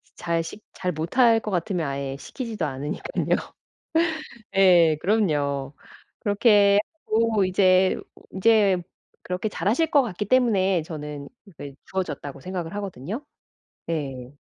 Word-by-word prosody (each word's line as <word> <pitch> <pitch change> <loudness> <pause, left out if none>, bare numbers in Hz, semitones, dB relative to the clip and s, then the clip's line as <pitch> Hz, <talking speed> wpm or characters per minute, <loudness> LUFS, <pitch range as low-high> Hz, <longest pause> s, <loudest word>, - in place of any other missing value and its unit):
잘 170 -1 -1
식 205 +6 -9
잘 180 -1 -2
못할 225 - +3
것 215 - -5
같으면 175 -3 -1
아예 140 0 -4
시키지도 230 - -5
않으니깐요. 145 - -2 1.2
예. 175 -5 +6
그럼요. 145 -9 0 0.5
그렇게 205 -1 +4 0.3
하고 220 -3 +2
이제 185 0 +3 0.3
인제 195 -2 +3 0.4
그렇게 185 +4 -3
잘 195 - -4
하실 320 +9 +2
것 285 - +6
같기 210 -2 -4
때문에 195 -7 +3
저는 150 -3 -7 0.3
그 140 -1 -8
주어졌다고 145 -7 -4
생각을 180 -1 -5
하거든요. 200 - -5 0.7
예. 135 -5 -4
185 Hz, 255 characters per minute, -24 LUFS, 150-210 Hz, 1.2 s, 예